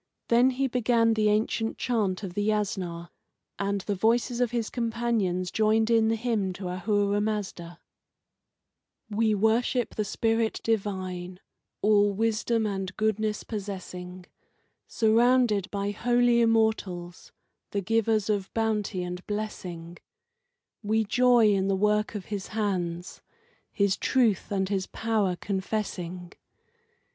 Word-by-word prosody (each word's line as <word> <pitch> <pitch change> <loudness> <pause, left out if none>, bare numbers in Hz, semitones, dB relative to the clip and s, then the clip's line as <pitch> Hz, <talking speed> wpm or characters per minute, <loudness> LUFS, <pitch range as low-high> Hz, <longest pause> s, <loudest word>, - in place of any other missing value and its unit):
Then 240 +2 +5
he 265 +1 -1
began 235 -2 +2
the 215 -1 +2
ancient 220 +1 0
chant 215 -6 -1
of 185 -3 -5
the 205 - -1
Yasna, 190 -5 -2 0.5
and 200 0 -1
the 205 - -2
voices 235 +4 +1
of 245 - +2
his 235 -2 -2
companions 225 -7 -1
joined 220 +1 +2
in 225 -1 +4
the 225 - +2
hymn 220 -5 -1
to 180 0 -6
Ahura 205 +2 0
Mazda: 200 -5 -4 1.3
We 215 0 +2
worship 225 +4 +1
the 215 - -1
Spirit 225 +2 0
Divine, 185 -4 -2 0.4
all 205 -1 +4
wisdom 225 +1 0
and 195 -3 -4
goodness 215 0 0
possessing, 185 -3 -7 0.6
Surrounded 230 -2 +3
by 200 0 -2
Holy 240 +2 +3
Immortals, 220 -6 0 0.4
the 200 - -2
givers 220 +1 +1
of 205 -3 -1
bounty 215 -4 -1
and 180 +1 -6
blessing; 180 -5 -5 0.8
We 220 +1 +1
joy 240 0 +4
in 195 -1 +1
the 195 - +2
work 210 +2 +1
of 200 -3 -5
His 205 -2 -5
hands, 180 -5 -3 0.5
His 200 -2 +1
truth 230 -9 +1
and 190 -1 0
His 190 -1 -2
power 215 -5 0
confessing. 185 -2 -4
210 Hz, 125 wpm, -27 LUFS, 190-225 Hz, 1.3 s, Then